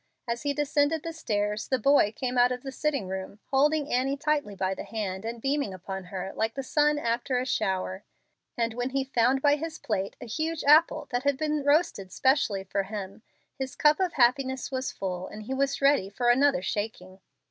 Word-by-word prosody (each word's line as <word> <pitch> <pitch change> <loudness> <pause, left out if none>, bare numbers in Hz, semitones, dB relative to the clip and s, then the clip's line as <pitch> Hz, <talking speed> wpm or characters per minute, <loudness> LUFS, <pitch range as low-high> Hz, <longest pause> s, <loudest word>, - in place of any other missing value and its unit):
As 235 0 -2
he 285 - 0
descended 295 +2 +1
the 330 - -5
stairs, 210 -8 -2
the 260 - +1
boy 255 -3 +4
came 250 +3 -3
out 245 0 +5
of 250 0 -4
the 270 - -5
sitting 280 -7 -1
room, 190 +1 -5
holding 295 +2 +2
Annie 265 +3 +1
tightly 290 -7 -1
by 190 0 -1
the - - -6
hand 195 -4 -4
and 230 +1 -4
beaming 275 -5 -1
upon 190 +1 -6
her 190 +1 -5
like 225 +1 -1
the 270 - -3
sun 295 +2 +2
after 245 -1 -1
a 250 - -1
shower, 190 -5 -1 0.5
and 230 -1 0
when 245 +2 -2
he 270 0 0
found 265 0 +1
by 290 0 +5
his 320 +1 -5
plate 200 -3 -3
a - - -8
huge 315 +7 -2
apple 305 +3 +5
that 245 - 0
had 280 0 +1
been 300 -1 -1
roasted 285 - +1
specially 260 -6 +2
for 195 +1 -1
him, 195 0 -7 0.4
his 265 -1 -4
cup 300 +2 +4
of 370 -2 0
happiness 260 +1 +2
was 260 0 -2
full 185 -1 -4
and 215 - -9
he 260 - -4
was 275 +1 0
ready 275 -9 +4
for 240 +4 +2
another 270 -6 +3
shaking. 190 -3 -4
255 Hz, 200 wpm, -27 LUFS, 205-285 Hz, 0.5 s, out